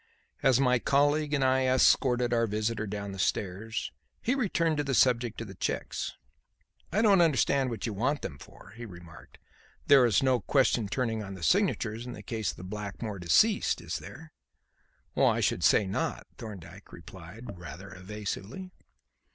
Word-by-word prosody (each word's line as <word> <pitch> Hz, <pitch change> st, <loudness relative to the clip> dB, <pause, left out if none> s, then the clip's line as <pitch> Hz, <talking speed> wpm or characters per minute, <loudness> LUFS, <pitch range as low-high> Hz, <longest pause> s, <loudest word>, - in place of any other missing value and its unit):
As 130 Hz, -2 st, +4 dB
my 125 Hz, -2 st, +3 dB
colleague 145 Hz, +3 st, +2 dB
and 145 Hz, -2 st, +1 dB
I 130 Hz, 0 st, +3 dB
escorted 125 Hz, -1 st, +3 dB
our 115 Hz, -1 st, +2 dB
visitor 110 Hz, +1 st, -2 dB
down 100 Hz, 0 st, -5 dB
the 95 Hz, -, -8 dB
stairs, 100 Hz, +4 st, -2 dB, 0.3 s
he 250 Hz, -, 0 dB
returned 170 Hz, -, 0 dB
to 145 Hz, -, 0 dB
the 135 Hz, -2 st, -1 dB
subject 120 Hz, -3 st, +2 dB
of 115 Hz, -, -6 dB
the 95 Hz, -, -9 dB
cheques. -, -, -3 dB, 0.8 s
"I 215 Hz, -, +2 dB
don't 200 Hz, -4 st, +5 dB
understand 140 Hz, -4 st, +2 dB
what 115 Hz, -, -4 dB
you 115 Hz, -, -3 dB
want 130 Hz, +9 st, -1 dB
them 70 Hz, -5 st, -6 dB
for," -, -, -15 dB
he 120 Hz, -, -9 dB
remarked. 85 Hz, -6 st, -12 dB, 0.5 s
"There 140 Hz, -2 st, +7 dB
is 110 Hz, +2 st, +2 dB
no 130 Hz, -2 st, +3 dB
question 125 Hz, -5 st, +2 dB
turning 115 Hz, -1 st, -1 dB
on 95 Hz, -2 st, -7 dB
signatures 120 Hz, -, +1 dB
in 125 Hz, -, -6 dB
the 105 Hz, -, -10 dB
case 110 Hz, -3 st, -2 dB
of 90 Hz, -, -10 dB
Blackmore 105 Hz, +1 st, -5 dB
deceased, 200 Hz, -, +3 dB
is -, -, -4 dB
there?" 160 Hz, -1 st, -12 dB, 0.8 s
"I -, -, +3 dB
should -, -, 0 dB
say 105 Hz, -, +5 dB
not," 95 Hz, -, -3 dB
Thorndyke 100 Hz, -7 st, -10 dB
replied 90 Hz, +4 st, -11 dB
rather 90 Hz, +2 st, -9 dB
evasively. 105 Hz, -, -6 dB
115 Hz, 160 wpm, -29 LUFS, 100-135 Hz, 0.8 s, There